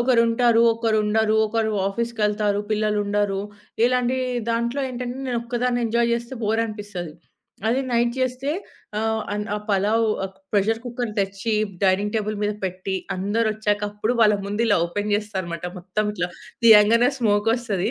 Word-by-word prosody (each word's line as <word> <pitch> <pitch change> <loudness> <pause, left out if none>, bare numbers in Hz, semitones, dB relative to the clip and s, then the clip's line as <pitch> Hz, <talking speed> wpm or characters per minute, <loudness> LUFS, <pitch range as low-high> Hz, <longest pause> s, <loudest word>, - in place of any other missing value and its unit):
ఒకరుంటారు, 235 -1 +4
ఒకరుండరు 220 -1 +1
ఒకరు 220 0 0 0.2
ఆఫీస్‌కేళ్తారు, 210 -1 0
పిల్లలు 215 -1 +1
ఉండరు 205 -1 0 0.4
ఇలాంటి 250 +1 +2 0.3
దాంట్లో 235 +4 0
ఏంటంటే, 250 0 -5
నేనొక్కదాన్ని 245 0 -1
ఎంజాయ్ 235 +1 +1
చేస్తే 235 +2 -5
బోరనిపిస్తది. 210 -6 -2 0.6
అది 255 +4 +2
నైట్ 235 0 +2
చేస్తే 255 +2 -1 0.5
ఆహ్, 220 0 0
అన్ 210 0 -2
ఆ - - 0
పలావు 210 +3 +2 0.5
ప్రెషర్ 220 +2 +2
కుక్కర్ 240 -2 -3
తెచ్చి, 195 +3 -2 0.3
డైనింగ్ 200 +2 +2
టేబుల్ 215 0 -2
మీద 210 - +1
పెట్టి, 185 +1 -3 0.2
అందరొచ్చాక 210 +1 0
అప్పుడు 210 +3 -1
వాళ్ళ 210 -2 +6
ముందు 205 +3 -1
ఇలా 205 - +4
ఓపెన్ 205 +4 -3
చేస్తాన్నమాట. 190 -5 -3
మొత్తం 190 +4 -2
ఇట్లా 175 -3 -2 0.4
తీయంగానే 225 +2 +7
స్మోకోస్తది 220 -1 +1
220 Hz, 125 wpm, -23 LUFS, 205-235 Hz, 0.6 s, తీయంగానే